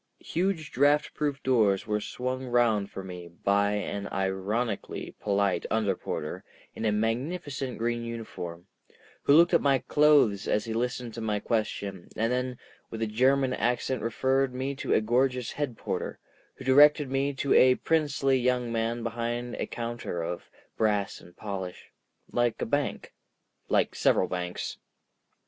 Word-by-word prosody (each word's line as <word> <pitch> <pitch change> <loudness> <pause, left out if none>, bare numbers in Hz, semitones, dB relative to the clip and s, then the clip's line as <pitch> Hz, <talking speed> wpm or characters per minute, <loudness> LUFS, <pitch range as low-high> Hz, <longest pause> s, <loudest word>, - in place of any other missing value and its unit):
Huge 170 -3 -2
draught 145 +2 +3
proof 145 -2 -2
doors 110 -6 +3
were 105 -1 -1
swung 130 +3 -4
round 115 -5 +2
for 95 - -7
me 90 -2 -8
by 100 +4 +1
an 100 -1 -3
ironically 95 +3 -2
polite 100 -3 +1
under 110 -4 +1
porter 85 +3 -5 0.3
in 110 - -4
a 110 - +3
magnificent 130 +5 -2
green 120 +1 -1
uniform, 90 -7 -6 0.6
who 140 - +5
looked 170 +3 +6
at 170 - +5
my 140 -1 +4
clothes 140 -9 +3
as 105 - +1
he 115 - -3
listened 120 0 -2
to 115 - -6
my 105 -2 0
question 100 -4 -2
and 115 +2 0
then 125 0 -2 0.3
with 115 0 -4
a - - +2
German 130 +4 +2
accent 125 +1 0
referred 130 +3 +1
me 135 +2 -2
to 135 - -4
a - - +4
gorgeous 125 +2 +1
head 140 -6 -3
porter, - - -3 0.4
who 130 - -11
directed 145 +1 +6
me 135 +1 +1
to 135 +1 +1
a 130 0 +7
princely 145 -4 +1
young 125 -1 +1
man 115 +1 -1
behind 120 +1 -3
a - - -2
counter 115 -7 -4
of 85 +1 -5 0.3
brass 105 -3 0
and 85 - -17
polish, 95 -3 -6 0.4
like 120 -1 +1
a - - -1
bank—like 145 +4 -3
several 90 - +3
banks. 90 -1 -4
120 Hz, 150 wpm, -28 LUFS, 105-130 Hz, 0.6 s, a